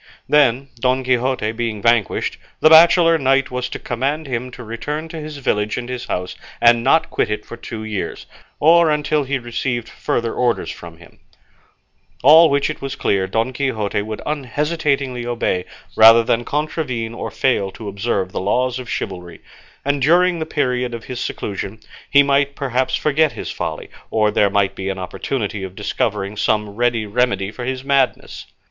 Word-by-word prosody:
Then, 140 Hz, -2 st, +3 dB
Don 130 Hz, +1 st, +1 dB
Quixote 125 Hz, -3 st, 0 dB
being 115 Hz, -2 st, -3 dB
vanquished, 115 Hz, -1 st, +1 dB, 0.2 s
the 155 Hz, -, +5 dB
bachelor 165 Hz, 0 st, +7 dB
knight 135 Hz, -1 st, +2 dB
was 125 Hz, 0 st, -3 dB
to -, -, -5 dB
command 140 Hz, +6 st, -2 dB
him 125 Hz, -2 st, -3 dB
to 125 Hz, -1 st, -10 dB
return 145 Hz, +8 st, -5 dB
to 165 Hz, -, -7 dB
his 155 Hz, -1 st, -7 dB
village 105 Hz, -6 st, -1 dB
and 120 Hz, -1 st, -4 dB
his 125 Hz, -1 st, -5 dB
house, 90 Hz, 0 st, -4 dB, 0.2 s
and 120 Hz, 0 st, +5 dB
not 160 Hz, +5 st, +3 dB
quit -, -, 0 dB
it 105 Hz, 0 st, -3 dB
for -, -, -8 dB
two 110 Hz, -2 st, -7 dB
years, 110 Hz, -3 st, -5 dB, 0.3 s
or 165 Hz, +1 st, +5 dB
until 150 Hz, -1 st, 0 dB
he 135 Hz, +1 st, -1 dB
received 120 Hz, -1 st, -3 dB
further 115 Hz, 0 st, -2 dB
orders 120 Hz, -2 st, 0 dB
from 85 Hz, -1 st, -11 dB
him; 85 Hz, -1 st, -18 dB, 1.0 s
all 160 Hz, +4 st, +8 dB
which 140 Hz, 0 st, +1 dB
it 155 Hz, -, -5 dB
was 135 Hz, -1 st, -4 dB
clear 95 Hz, -1 st, 0 dB
Don 115 Hz, +6 st, -1 dB
Quixote 115 Hz, -7 st, -1 dB
would 110 Hz, 0 st, -6 dB
unhesitatingly 140 Hz, -2 st, -1 dB
obey, 115 Hz, -6 st, -1 dB, 0.3 s
rather 115 Hz, +1 st, +8 dB
than 120 Hz, +1 st, 0 dB
contravene 140 Hz, -6 st, -2 dB
or -, -, -5 dB
fail 120 Hz, -7 st, 0 dB
to 105 Hz, +2 st, -10 dB
observe 100 Hz, -2 st, -2 dB
the -, -, -3 dB
laws 125 Hz, +6 st, 0 dB
of 125 Hz, -3 st, -8 dB
chivalry; 90 Hz, -2 st, -5 dB, 0.5 s
and 140 Hz, 0 st, 0 dB
during 175 Hz, +4 st, +3 dB
the 160 Hz, -, -3 dB
period 125 Hz, -4 st, -1 dB
of 115 Hz, -, -8 dB
his 125 Hz, -1 st, -6 dB
seclusion 100 Hz, +1 st, -5 dB, 0.3 s
he 140 Hz, 0 st, +6 dB
might 140 Hz, 0 st, +1 dB
perhaps 130 Hz, -1 st, -1 dB
forget 150 Hz, +4 st, +1 dB
his -, -, -6 dB
folly, -, -, -5 dB, 0.2 s
or 105 Hz, -1 st, +2 dB
there 100 Hz, -, +3 dB
might 100 Hz, -1 st, +1 dB
be 95 Hz, 0 st, -4 dB
an 95 Hz, -, -3 dB
opportunity 100 Hz, +3 st, -4 dB
of 95 Hz, -1 st, -7 dB
discovering 105 Hz, -1 st, -2 dB
some 105 Hz, 0 st, 0 dB
ready 115 Hz, 0 st, 0 dB
remedy 105 Hz, -2 st, 0 dB
for 120 Hz, +2 st, -7 dB
his 130 Hz, 0 st, -3 dB
madness. 135 Hz, -2 st, 0 dB
125 Hz, 175 wpm, -19 LUFS, 110-140 Hz, 1.0 s, all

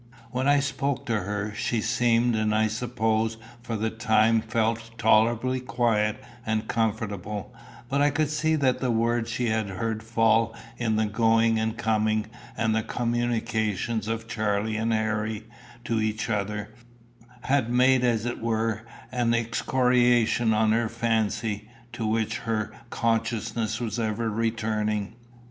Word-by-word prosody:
When 130 Hz, +2 st, -1 dB
I 145 Hz, 0 st, +5 dB
spoke 140 Hz, -1 st, -2 dB
to 115 Hz, -3 st, 0 dB
her, 105 Hz, +2 st, -3 dB
she 115 Hz, +2 st, -1 dB
seemed, 120 Hz, +1 st, +2 dB
and 110 Hz, 0 st, +1 dB
I 110 Hz, 0 st, +3 dB
suppose 110 Hz, 0 st, 0 dB, 0.2 s
for 115 Hz, -1 st, -4 dB
the 110 Hz, +1 st, -1 dB
time 110 Hz, 0 st, +3 dB
felt 115 Hz, +1 st, -1 dB
tolerably 115 Hz, +3 st, +3 dB
quiet 115 Hz, -4 st, 0 dB, 0.2 s
and 110 Hz, 0 st, -1 dB
comfortable; 105 Hz, -3 st, -2 dB, 0.3 s
but 140 Hz, +2 st, 0 dB
I 145 Hz, -, +5 dB
could 150 Hz, +1 st, 0 dB
see 155 Hz, +1 st, +1 dB
that 130 Hz, -4 st, +2 dB
the 130 Hz, -, -1 dB
words 115 Hz, 0 st, +1 dB
she 115 Hz, 0 st, -1 dB
had 110 Hz, -2 st, 0 dB
heard 110 Hz, +3 st, -3 dB
fall 115 Hz, 0 st, +2 dB, 0.2 s
in 115 Hz, -2 st, +1 dB
the 110 Hz, 0 st, +2 dB
going 115 Hz, +1 st, +3 dB
and 110 Hz, 0 st, -1 dB
coming, 110 Hz, -1 st, +1 dB, 0.3 s
and 110 Hz, -1 st, +1 dB
the 110 Hz, -, +2 dB
communications 115 Hz, -2 st, -1 dB
of 115 Hz, 0 st, -3 dB
Charlie 110 Hz, -1 st, -1 dB
and 110 Hz, +1 st, 0 dB
Harry 110 Hz, -1 st, -1 dB, 0.4 s
to 115 Hz, -2 st, 0 dB
each 110 Hz, +1 st, -1 dB
other, 105 Hz, +1 st, -2 dB, 0.7 s
had 130 Hz, -3 st, +1 dB
made 125 Hz, +1 st, +4 dB
as 115 Hz, -2 st, +1 dB
it 120 Hz, -, -3 dB
were 110 Hz, -1 st, 0 dB, 0.3 s
an 120 Hz, -2 st, +1 dB
excoriation 120 Hz, 0 st, +2 dB
on 110 Hz, 0 st, +3 dB
her 115 Hz, 0 st, +1 dB
fancy, 110 Hz, -2 st, -1 dB, 0.2 s
to 110 Hz, -, -2 dB
which 110 Hz, 0 st, 0 dB
her 110 Hz, -2 st, -2 dB, 0.2 s
consciousness 115 Hz, -1 st, -1 dB
was 120 Hz, 0 st, -3 dB
ever 110 Hz, 0 st, -1 dB
returning. 110 Hz, -1 st, -1 dB
115 Hz, 145 wpm, -26 LUFS, 110-120 Hz, 0.7 s, I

